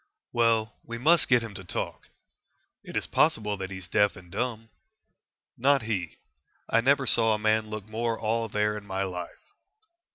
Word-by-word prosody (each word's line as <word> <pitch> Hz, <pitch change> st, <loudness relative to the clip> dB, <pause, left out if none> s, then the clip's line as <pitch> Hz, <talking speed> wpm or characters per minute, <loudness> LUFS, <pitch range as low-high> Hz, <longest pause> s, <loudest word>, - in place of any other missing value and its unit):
"Well, 115 Hz, -2 st, +2 dB
we 115 Hz, 0 st, -6 dB
must 160 Hz, +8 st, +5 dB
get 125 Hz, -2 st, +4 dB
him 110 Hz, -2 st, -7 dB
to 95 Hz, -, -8 dB
talk." 90 Hz, -, -5 dB, 0.7 s
"It -, -, -5 dB
is -, -, -1 dB
possible 110 Hz, -10 st, +2 dB
that 95 Hz, -1 st, -5 dB
he 95 Hz, -, -6 dB
is 95 Hz, -2 st, -9 dB
deaf 105 Hz, +2 st, +2 dB
and 90 Hz, -1 st, -14 dB
dumb." 115 Hz, +1 st, -3 dB, 0.8 s
"Not 135 Hz, +1 st, +3 dB
he. 105 Hz, -6 st, -3 dB, 0.5 s
I 115 Hz, -, +3 dB
never 135 Hz, +2 st, +3 dB
saw 115 Hz, -3 st, +3 dB
a -, -, -2 dB
man 110 Hz, 0 st, +1 dB
look 110 Hz, -2 st, -6 dB
more 115 Hz, +1 st, -2 dB
all 115 Hz, +1 st, -1 dB
there 105 Hz, 0 st, 0 dB
in 105 Hz, -1 st, -8 dB
my 95 Hz, 0 st, -1 dB
life." 90 Hz, -, -7 dB
110 Hz, 175 wpm, -27 LUFS, 105-115 Hz, 0.8 s, must